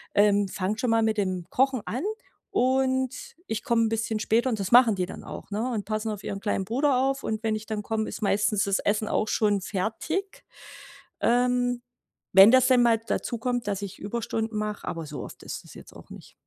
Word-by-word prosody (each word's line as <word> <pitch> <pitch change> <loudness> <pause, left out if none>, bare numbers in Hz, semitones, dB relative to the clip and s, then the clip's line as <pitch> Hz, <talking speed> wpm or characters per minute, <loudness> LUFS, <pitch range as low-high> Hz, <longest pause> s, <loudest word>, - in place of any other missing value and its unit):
ähm, 205 -1 +4
fangt 195 +3 -3
schon 250 - 0
mal 225 0 +3
mit 220 0 +1
dem 185 -4 -1
Kochen 265 -2 +1
an 255 +6 -3 0.5
und 260 0 +1 0.3
ich 220 0 -3
komme 230 -1 +2
'n 225 - +1
bisschen 225 0 -1
später“ 230 +4 +1
und 220 -3 -2
das 195 +2 -3
machen 240 -3 +7
die 185 - -1
dann 180 - -9
auch, - - -9
ne, 220 +5 -1
und 210 -4 -3
passen 215 +1 -2
auf 205 -2 -5
ihren 200 - -4
kleinen 195 -1 -1
Bruder 260 +5 +1
auf 270 +1 0
und 220 0 -3
wenn 220 -1 +1
ich 215 0 -6
dann 215 -1 -4
komme, 220 0 -2
ist 215 - -7
meistens 205 0 +2
das 195 -1 +1
Essen 210 +1 0
auch 215 - 0
schon 205 -2 +1
fertig. 315 - -3 0.8
Ähm, 245 0 +2 0.5
wenn 195 +3 +9
das 260 -1 +5
dann 250 -2 +5
mal 230 -2 +4
dazukommt, 235 0 -2
dass 200 -1 -2
ich 195 - -7
Überstunden 225 +1 -3
mache, 210 -1 -4
aber 165 -2 -4
so 150 -1 -6
oft - - -11
ist - - -6
das - - -14
jetzt - - -13
auch - - -14
nicht. - - -12
220 Hz, 210 wpm, -26 LUFS, 205-245 Hz, 0.8 s, wenn